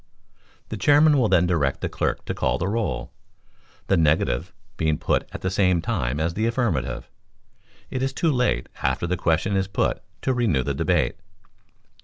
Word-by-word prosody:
The 110 - -4
Chairman 145 +6 +5
will 120 - +3
then 90 -2 +4
direct 80 -6 0
the - - -1
clerk - - -2
to - - -2
call - - 0
the 90 - -2
roll. 110 -3 -2 0.7
The - - +2
negative 75 -6 +1 0.2
being 80 -2 0
put - - 0
at - - -7
the 95 - -1
same 95 -2 +3
time 65 -4 -2
as 80 +2 0
the 110 +5 0
affirmative, 65 - -1 0.8
it 130 - -2
is 135 0 0
too 165 +4 +1
late, 125 - 0
after - - 0
the 90 +1 0
question 85 +4 0
is 95 -1 +1
put, 95 - -1 0.2
to 130 - +1
renew 105 - +1
the 70 - -2
debate. 70 - +1
90 Hz, 175 wpm, -24 LUFS, 80-115 Hz, 0.8 s, Chairman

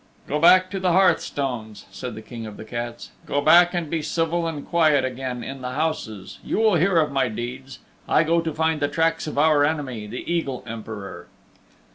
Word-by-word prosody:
"Go 150 - -1
back 185 +3 +6
to 195 - -3
the 185 -2 +1
hearthstones," 135 - 0
said 105 +5 -6
the 110 - -9
King 115 0 -8
of 105 - -10
the 110 - -9
Cats. 120 +1 -6 0.2
"Go 145 - 0
back 175 +4 +6
and 170 -2 -1
be 160 +1 -2
civil 165 +2 -1
and 150 -3 -5
quiet 155 -5 +3
again 130 -1 -4
in 135 0 -7
the 125 0 -4
houses. 130 -10 -3
You - - -2
will 220 -1 +4
hear 175 +2 +3
of 155 -3 +2
my 135 -2 +1
deeds. 125 +4 -6 0.3
I 155 - +4
go 165 +1 +2
to 165 -1 -3
find 160 0 0
the 145 - +1
tracks 165 +1 0
of 150 - -5
our 150 -1 +4
enemy, 140 -8 -2
the 120 +4 -7
Eagle 165 -7 -2
Emperor." 110 -3 -8
145 Hz, 200 wpm, -23 LUFS, 120-165 Hz, 0.3 s, back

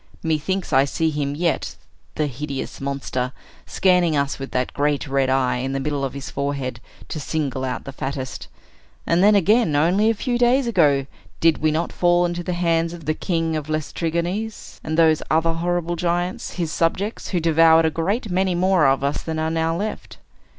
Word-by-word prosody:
Methinks 160 +2 -1
I 135 +1 +6
see 160 +3 0
him 145 -1 -2
yet, 170 +2 -1 0.4
the 155 - 0
hideous 140 0 -5
monster, 135 -2 -3 0.3
scanning 180 -4 +2
us 140 0 -1
with 135 - -5
that 125 0 -2
great 145 0 0
red 135 -1 +1
eye, 130 -2 +2
in 130 +2 -3
the 135 - -1
middle 145 0 -2
of 135 0 -3
his 140 -1 -6
forehead, 140 -3 -3 0.3
to 155 - -4
single 140 -3 -2
out 130 -1 -3
the 135 - -7
fattest. 135 -1 -5 0.6
And 170 +1 +2
then, 210 +1 +6
again, 200 -3 +3
only 180 +9 +3
a 225 - +1
few 240 +2 -1
days 245 +2 +3
ago, 150 - +3 0.3
did 165 -1 +3
we 155 - +2
not 160 +2 -1
fall 175 0 +3
into 175 0 -2
the 180 +1 -3
hands 170 -1 +1
of 165 -3 -10
the 155 - +1
king 165 -1 -1
of 155 -1 -4
the 155 - -2
Laestrygons, 170 +7 -3
and 155 0 -3
those 160 -2 +4
other 165 +1 +2
horrible 175 0 -1
giants, 175 +1 -2
his 170 -4 -2
subjects, 195 +7 -1
who 180 - 0
devoured 165 0 +5
a 160 - +2
great 195 - -2
many 185 0 +1
more 180 -4 +3
of 135 0 +2
us 140 +1 -1
than 160 -1 -4
are 160 0 -1
now 165 0 0
left? 210 +3 -5
160 Hz, 190 wpm, -22 LUFS, 140-175 Hz, 0.6 s, I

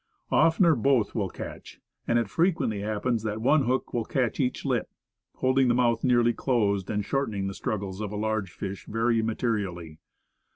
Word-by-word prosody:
Oftener 165 +2 +4
both 130 -3 +2
will 100 -5 -1
catch, - - -9 0.3
and 115 - +3
it 115 -3 +1
frequently 140 - 0
happens 110 +3 -1
that 110 0 -3
one 135 +4 +3
hook 130 +2 -1
will 120 - 0
catch 125 -1 -1
each 130 -2 -1
lip, - - 0 0.5
holding 130 0 +2
the 120 - +3
mouth 120 -2 +2
nearly 120 -2 +3
closed, 100 -8 0
and 105 -1 -1
shortening 110 -8 -1
the 95 - -3
struggles 100 -1 -4
of 105 -2 -4
a - - -5
large 110 -3 -1
fish 95 +3 -6
very 115 +1 +1
materially. 100 -8 -2
115 Hz, 170 wpm, -27 LUFS, 105-125 Hz, 0.5 s, Oftener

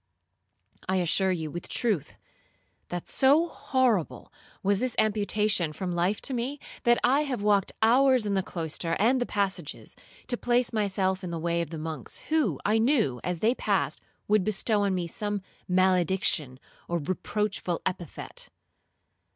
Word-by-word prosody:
I 190 - +2
assure 185 +1 +2
you, 160 -4 -3
with 175 +2 -6
truth, 200 - -1 0.7
that 175 -1 -5
so 290 +6 +4
horrible 255 - 0 0.3
was 200 0 +3
this 255 0 -1
amputation 210 -5 +1
from 185 +2 -4
life 175 +4 0
to 270 - -3
me, 255 +4 -2 0.3
that 240 0 +5
I 270 +4 +4
have 255 -7 -3
walked 205 -2 +2
hours 255 +1 +5
in 205 - 0
the 190 - +2
cloister 165 -2 -2
and 245 +5 +3
the 245 - 0
passages, 190 -6 -3 0.3
to 245 - -2
place 245 0 +1
myself 190 -3 0
in 180 - -4
the 170 - -3
way 170 +1 0
of 170 - -4
the 165 - -6
monks, 155 -4 -6
who, 290 - +1
I 215 +2 +3
knew, 225 - +2
as 180 -2 -3
they 230 +3 +4
passed, - - -1 0.3
would 210 -2 +3
bestow 215 +1 +1
on 200 -2 +1
me 180 -1 -1
some 205 +3 -3 0.2
malediction 180 -6 +2 0.3
or 170 - 0
reproachful 185 +2 -2
epithet. 175 -4 -5
195 Hz, 155 wpm, -27 LUFS, 175-230 Hz, 0.7 s, that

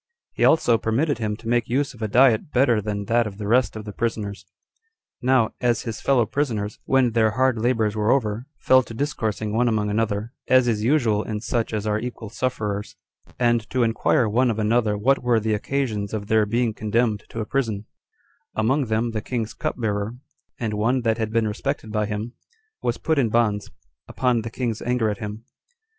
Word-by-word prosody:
He - - -1
also 120 -8 +4
permitted 135 +7 0
him 105 -2 -2
to 115 - -11
make 120 -1 +1
use 140 +4 0
of 120 - -15
a 110 - 0
diet 120 +3 +4
better 125 -4 +3
than 100 -1 -3
that 115 +1 +2
of 100 -2 -8
the 105 - -5
rest 120 +4 +2
of 110 -1 -7
the 105 - -7
prisoners. 105 -3 -3 0.7
Now, 125 -3 +3
as 120 -2 +1
his 115 -3 -5
fellow 130 -4 +3
prisoners, 110 -5 -2
when 130 -3 +3
their 110 -1 +3
hard 130 +1 +1
labors 110 -3 +1
were 105 0 0
over, 120 -1 +1
fell 130 0 +5
to 115 -2 -10
discoursing 110 -6 -2
one 120 +2 +2
among 105 -2 0
another, 110 +2 -1
as 130 -1 +5
is 110 -3 0
usual 115 -5 +2
in 110 -1 -4
such 115 0 -1
as 105 -1 -2
are 105 0 0
equal 120 -2 -6
sufferers, 105 -4 -3 0.4
and 120 -2 +1
to 130 -2 +1
inquire 115 +1 +2
one 120 +4 +2
of 110 - -1
another 110 -1 +1
what 135 +6 +2
were 120 -2 +2
the 110 0 0
occasions 110 -3 -2
of 105 -1 -4
their 110 0 +2
being 115 +1 +1
condemned 110 0 0
to 115 - -6
a 110 - -2
prison: 110 -6 -2 0.7
among 130 +6 +1
them 115 +1 0
the 110 -1 -3
king's 115 -2 -3
cupbearer, 110 -1 -2 0.4
and 110 -3 -2
one 115 +5 +1
that 115 -1 0
had 110 -1 -1
been 115 -1 +1
respected 110 +1 -3
by 105 -1 0
him, 110 +3 -4 0.5
was - - -1
put 160 -2 0
in 120 -4 +2
bonds, 105 -3 +1 0.4
upon 125 -3 +1
the 115 - -5
king's 115 -1 -3
anger 120 -3 +1
at 105 - -6
him. 105 +1 -6
115 Hz, 195 wpm, -23 LUFS, 105-125 Hz, 0.7 s, fell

